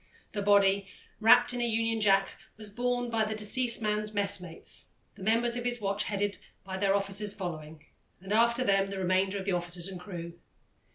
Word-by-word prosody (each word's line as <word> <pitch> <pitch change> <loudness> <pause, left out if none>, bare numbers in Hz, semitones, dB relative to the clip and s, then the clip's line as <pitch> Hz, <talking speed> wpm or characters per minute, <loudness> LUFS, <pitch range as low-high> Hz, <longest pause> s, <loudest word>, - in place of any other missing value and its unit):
The 205 - -3
body, 200 -1 +3 0.3
wrapped 225 +2 +6
in 245 - -2
a - - +1
Union 225 0 0
Jack, 195 -1 +4 0.3
was 215 -1 -8
borne 245 +1 -1
by 225 -1 +1
the 215 0 -3
deceased 235 +2 +1
man's 210 0 -2
messmates, 200 -4 -1 0.2
the - - -16
members 230 +4 +2
of 245 - -3
his 240 0 0
watch 200 0 -1
headed 205 -1 -2 0.2
by 190 0 -6
their 195 0 +2
officers 200 +1 0
following, 160 -5 -7 0.3
and 190 +3 -5
after 235 +3 +3
them 195 -3 +2
the 195 - -5
remainder 190 +1 +1
of 190 - -5
the 200 - 0
officers 175 0 -3
and 190 -2 -7
crew. 175 -2 -7
200 Hz, 185 wpm, -29 LUFS, 190-220 Hz, 0.3 s, wrapped